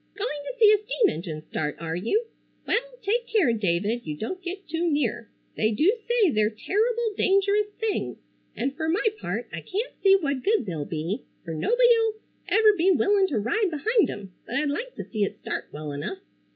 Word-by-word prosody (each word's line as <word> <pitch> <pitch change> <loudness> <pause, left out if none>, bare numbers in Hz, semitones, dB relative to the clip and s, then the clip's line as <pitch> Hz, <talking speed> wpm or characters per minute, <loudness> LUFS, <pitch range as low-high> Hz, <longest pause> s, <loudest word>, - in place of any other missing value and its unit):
"Going 405 -8 -3
to - - -16
see 430 -3 +7
a 420 - +3
steam 445 -2 +2
engine 160 - -5
start, 150 -1 -3
are 165 0 -3
you! 320 - 0 0.4
Well, 475 - +2 0.2
take 465 +4 0
care, 370 - +3
David, 210 +2 0
you 150 -5 -5
don't 365 - -4
get 375 +2 -6
too 330 +2 0
near. 250 -6 -1 0.3
They 215 - +2
do 315 - +3
say 460 -7 +3
they're 215 -3 +2
terrible 440 - 0
dangerous 400 +2 +3
things, 445 -2 -2 0.4
and 270 +3 -2
fer 315 +1 -2
my 365 +8 +1
part - - -3
I - - -4
can't 435 +6 -3
see 390 -1 +7
what 280 -8 -1
good 425 - +2
they'll 160 -7 -3
be, 165 +7 -3 0.2
fer 165 - -4
nobody'll 460 - +3 0.3
ever 430 0 +5
be 360 +1 +3
willin' 395 +1 +4
to 290 - -1
ride 395 - +1
behind 420 - +2
'em, 195 -3 -7
but 240 - -4
I'd 295 +2 +1
like 485 +12 -4
to - - -5
see 215 -3 -1
it 200 - -2
start - - -5
well 150 0 -6
enough. 145 - -4
345 Hz, 195 wpm, -26 LUFS, -, 0.4 s, see